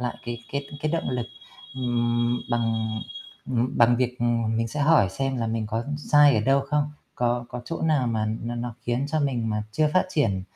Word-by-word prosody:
lại 125 -1 -2
cái 120 -1 -3
cái 140 0 -2
cái 155 - 0
động 165 - -1
lực, 125 -2 -2 0.5
ừm, 120 -1 0
bằng, 110 -2 0 0.5
ừm, 125 0 -1
bằng 120 0 +6
việc, 125 0 -1
ừm, 115 -2 +1
mình 115 0 0
sẽ 150 +6 -4
hỏi 145 -10 +5
xem 135 +4 -2
là 115 -2 -1
mình 110 -1 -2
có 115 +2 -2
sai 145 -2 +5
ở 110 - +3
đâu 135 +4 +3
không, 150 +1 0 0.2
có 120 0 0
có 125 0 -6
chỗ 165 +6 -5
nào 150 -6 +2
mà 110 -2 0 0.2
nó 120 +1 -3
nó 120 -1 -4
khiến 120 +3 -1
cho 155 0 0
mình 120 -5 0
mà 105 0 -1
chưa 155 +5 +2
phát 185 - +4
triển 105 - +1
120 Hz, 210 wpm, -25 LUFS, 115-140 Hz, 0.5 s, bằng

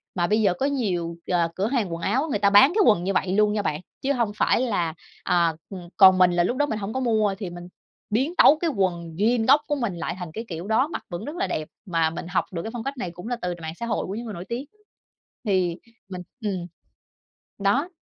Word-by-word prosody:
Mà 175 -2 +1
bây 215 +3 +2
giờ 195 -4 +3
có 220 - -2
nhiều, 185 -12 -1
ờ, 170 -2 +2
cửa 195 +3 0
hàng 225 -8 -1
quần 165 - -5
áo, 255 - 0
người 210 - 0
ta 200 - +4
bán 265 - +7
cái 435 - +4
quần 185 -5 +4
như 195 - -1
vậy 185 - +1
luôn 210 +1 +3
nha 210 - 0
bạn, 155 -5 -2 0.2
chứ 275 +1 +1
hông 235 -5 0
phải - - +2
là, 185 -10 0 0.3
à, 170 -2 +2 0.2
ừm, 180 -3 -9
còn 190 -2 +8
mình 180 -1 +5
là 175 0 +2
lúc 245 +8 -1
đó 290 - +3
mình 220 -7 -3
hổng 205 +2 -4
có 260 - -1
mua 215 -5 +1
thì 190 -4 -4
mình 175 0 -9 0.4
biến 265 +10 0
tấu 305 - +7
cái 335 +1 0
quần 175 - -2
jean 225 +4 +2
gốc 280 +3 +6
của 295 - 0
mình 235 -10 -2
lại - - -3
thành 175 -3 -6
cái 225 +5 -5
kiểu 170 +1 -6
đó. 225 +6 +2
Mặc 325 - -6
vẫn 175 -1 -5
rất 295 +4 -6
là 380 - -1
đẹp 155 0 -3 0.2
mà 165 -3 +1
mình 165 +1 -7
học 180 - 0
được 170 -3 -4
cái - - -4
phong 235 -2 -5
cách 275 +2 -4
này 180 -8 -4
cũng 180 +5 -10
là 245 - -1
từ 180 -1 -2
mạng 160 0 -5
xã 235 - -3
hội 230 - -1
của 195 - -4
những 235 +2 -5
người 220 - -6
nổi 175 0 -7
tiếng. 245 +4 -3 0.8
Thì 185 -4 +1 0.3
mình, 185 -1 -6 0.2
ừm, 185 -4 -2 0.9
đó. 245 - +1
200 Hz, 260 wpm, -24 LUFS, 175-240 Hz, 0.9 s, còn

